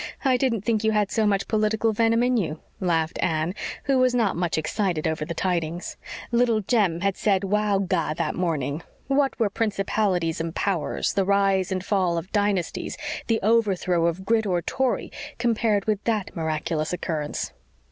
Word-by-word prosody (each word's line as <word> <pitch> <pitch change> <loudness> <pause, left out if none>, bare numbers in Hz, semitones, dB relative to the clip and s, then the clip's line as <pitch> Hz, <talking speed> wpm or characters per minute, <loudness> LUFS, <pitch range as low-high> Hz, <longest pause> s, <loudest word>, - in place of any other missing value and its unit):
I 260 -1 +4
didn't 245 -4 +1
think 220 +1 0
you 220 0 +2
had 210 -2 +1
so 220 -2 +2
much 200 -1 +1
political 220 +1 +1
venom 230 +2 +3
in 250 0 +2
you," 165 -8 -1 0.2
laughed 165 -4 0
Anne, 160 +1 0 0.3
who 275 -2 +2
was 255 -1 +3
not 225 -5 +2
much 175 -1 -1
excited 165 0 -1
over 160 -1 -1
the 170 +1 -5
tidings. 170 -1 -2 0.4
Little 235 -2 +3
Jem 195 -6 +1
had 195 -1 +1
said 200 -2 +1
"Wow 205 +1 +1
ga" 170 -5 0
that 165 -1 -1
morning. 155 -4 -1 0.2
What 275 0 +1
were 215 -3 +2
principalities 195 -6 0
and 165 0 -4
powers, 185 -7 -1
the 195 - +2
rise 195 -1 +2
and 185 0 -2
fall 185 -5 +1
of 170 +4 -5
dynasties, 205 -4 -1 0.3
the 225 -1 +2
overthrow 195 -6 +2
of 175 +3 -3
Grit 220 0 +2
or 175 -2 0
Tory, 265 -1 -1 0.3
compared 225 -4 +1
with 210 -2 0
that 215 -4 -1
miraculous 155 0 -2
occurrence? 155 -4 -3
195 Hz, 170 wpm, -25 LUFS, 170-220 Hz, 0.4 s, I